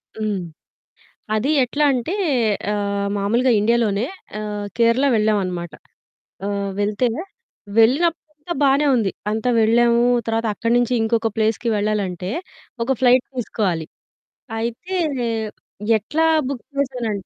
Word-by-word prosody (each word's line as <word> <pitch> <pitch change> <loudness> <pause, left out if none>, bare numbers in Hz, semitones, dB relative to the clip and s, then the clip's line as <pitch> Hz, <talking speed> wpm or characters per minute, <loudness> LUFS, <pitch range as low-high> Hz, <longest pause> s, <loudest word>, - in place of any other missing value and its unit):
హ్మ్. 215 -3 -2 1.0
అది 225 +6 0
ఎట్లా 285 +5 -1
అంటే 255 +7 -2 0.6
ఆహ్, 200 -1 -1
మామూలుగా 235 +6 +2
ఇండియాలోనే 220 -1 +2 0.3
ఆహ్, 210 -1 -4
కేరళ 235 +3 +3
వెళ్ళామనమాట. 190 -6 0 0.7
ఆహ్, 200 -1 -2
వెళ్తే 210 +4 +1 0.7
వెళ్ళినప్పుడంతా 305 +5 +1
బానే 280 +1 +4
ఉంది. 220 -6 +1 0.2
అంతా 220 +3 0
వెళ్ళాము. 235 +1 +4 0.2
తర్వాత 225 0 0
అక్కన్నించి 240 +3 +1
ఇంకొక 225 0 +1
ప్లేస్‌కి 220 +2 0
వెళ్ళాలంటే, 200 -4 -1 0.5
ఒక 240 - -11
ఫ్లైట్ 250 0 +5
తీసుకోవాలి. 195 -8 -1 0.7
అయితే 235 +12 -4 1.0
ఎట్లా 315 +10 0 0.2
బుక్ 270 -4 -5
చేసానంటే 240 -8 -2
225 Hz, 100 wpm, -21 LUFS, 205-250 Hz, 1.0 s, ఫ్లైట్